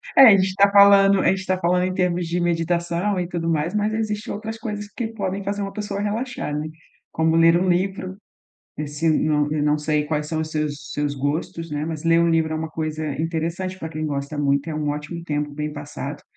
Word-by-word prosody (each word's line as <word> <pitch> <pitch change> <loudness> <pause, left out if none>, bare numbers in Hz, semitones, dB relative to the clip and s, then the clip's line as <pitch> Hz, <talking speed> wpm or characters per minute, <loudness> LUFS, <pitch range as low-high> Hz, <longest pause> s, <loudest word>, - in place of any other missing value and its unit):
É, 270 - +10
a 205 -3 +8
gente 190 0 +1
tá 200 +1 +5
falando 200 -1 +7
a - - +2
gente 190 0 -1
tá 185 0 0
falando 180 0 +1
em 185 - -2
termos 180 -2 0
de 170 +2 -1
meditação 175 +3 0
e 175 - -2
tudo 170 -1 -3
mais, 160 +2 0
mas 210 +1 0
existe 215 -1 -2
outras 220 +2 -5
coisas 210 -2 -5
que 220 +3 -4
podem 200 -3 -3
fazer 200 +1 -3
uma 195 0 -4
pessoa 205 -1 -4
relaxar, 220 - -3
né, 150 +1 -3 0.4
como 160 0 +1
ler 165 +1 +5
um 185 - 0
livro. 185 +1 -1 0.6
Esse 150 +2 -2
não 150 -1 +1
eu 150 -1 0
não 150 0 +3
sei 150 0 0
quais 150 0 -2
são 160 +1 -2
os 155 0 -4
seus 150 -2 -3
seus 145 -1 -1
gostos, 155 +4 -3
né, 150 0 -2
mas 160 -1 -5
ler 165 0 +4
um 170 - +3
livro 160 -1 +1
é - - -1
uma 160 0 -4
coisa 155 -1 -3
interessante 165 +3 -3
pra 160 - -5
quem 155 -1 -3
gosta 140 0 -4
muito, 140 +1 +1
é - - -4
um 150 -1 -2
ótimo 150 +3 -4
tempo 150 -2 -2
bem 150 +1 -3
passado, 145 -1 -7
165 Hz, 225 wpm, -22 LUFS, 150-190 Hz, 0.6 s, É